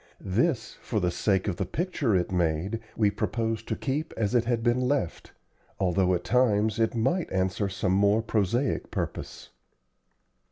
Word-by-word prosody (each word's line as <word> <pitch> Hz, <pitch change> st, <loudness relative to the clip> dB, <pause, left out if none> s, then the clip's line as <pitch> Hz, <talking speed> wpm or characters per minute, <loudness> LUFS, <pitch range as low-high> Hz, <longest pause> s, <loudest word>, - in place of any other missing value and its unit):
This, 125 Hz, -, 0 dB
for 110 Hz, -, -1 dB
the 90 Hz, -2 st, +1 dB
sake 95 Hz, +2 st, +1 dB
of 90 Hz, -4 st, -1 dB
the -, -, -1 dB
picture 155 Hz, -, 0 dB
it 90 Hz, 0 st, 0 dB
made, 90 Hz, +4 st, 0 dB, 0.2 s
we 105 Hz, -2 st, +3 dB
proposed 115 Hz, +1 st, -2 dB
to -, -, -1 dB
keep 150 Hz, +3 st, -3 dB
as 110 Hz, 0 st, 0 dB
it 120 Hz, -2 st, +3 dB
had 115 Hz, -1 st, 0 dB
been 120 Hz, +1 st, +2 dB
left, 135 Hz, -, -2 dB, 0.5 s
although 95 Hz, 0 st, +2 dB
at 90 Hz, -, -3 dB
times 110 Hz, -1 st, +2 dB
it 115 Hz, +1 st, +1 dB
might 135 Hz, +10 st, 0 dB
answer 95 Hz, +2 st, 0 dB
some 95 Hz, -1 st, -1 dB
more 100 Hz, +3 st, +3 dB
prosaic 115 Hz, +5 st, 0 dB
purpose. -, -, -5 dB
110 Hz, 160 wpm, -27 LUFS, 95-120 Hz, 0.5 s, we